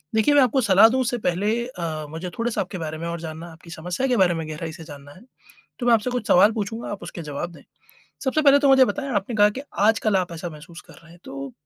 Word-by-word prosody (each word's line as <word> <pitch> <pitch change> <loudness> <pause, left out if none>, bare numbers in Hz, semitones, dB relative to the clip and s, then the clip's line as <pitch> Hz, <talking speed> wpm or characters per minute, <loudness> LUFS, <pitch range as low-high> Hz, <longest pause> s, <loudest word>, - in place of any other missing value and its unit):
देखिए 255 +7 +3
मैं 285 - +7
आपको 255 +1 +2
सलाह 205 0 +6
दूँ 260 +2 0
उससे 245 0 -1
पहले 185 +4 0 0.2
अ, 160 -8 -5
मुझे 165 +3 -6
थोड़ा-सा 230 -2 -1
आपके 185 0 -6
बारे 160 -1 -5
में 170 +1 -5
और 170 0 -4
जानना, 160 +1 -7
आपकी 165 +1 -16
समस्या 180 +10 -3
के 250 -2 +1
बारे 180 -2 +4
में 160 -1 -4
गहराई 160 +1 -5
से 165 0 -11
जानना 145 -2 -12
है, 185 - -16 0.6
तो 245 - -3
मैं 240 - +5
आपसे 225 +2 +2
कुछ 245 -4 -3
सवाल 205 +5 +6
पूछूँगा 225 +1 -4
आप 205 - -7
उसके 170 - -7
जवाब 150 +3 -5
दें। - - -14 0.6
सबसे 275 +3 +1
पहले 285 -1 +6
तो 280 -1 +3
मुझे 265 -1 +7
बताएँ 280 0 -3
आपने 205 +4 -2
कहा 205 0 +5
कि - - -4 0.3
आजकल 220 -2 +2
आप 180 -2 -2
ऐसा 170 +1 -6
महसूस 165 +3 -12
कर - - -13
रहे 165 - -17
हैं 175 - -17
तो, 135 -1 -7
185 Hz, 255 wpm, -23 LUFS, 165-235 Hz, 0.6 s, मैं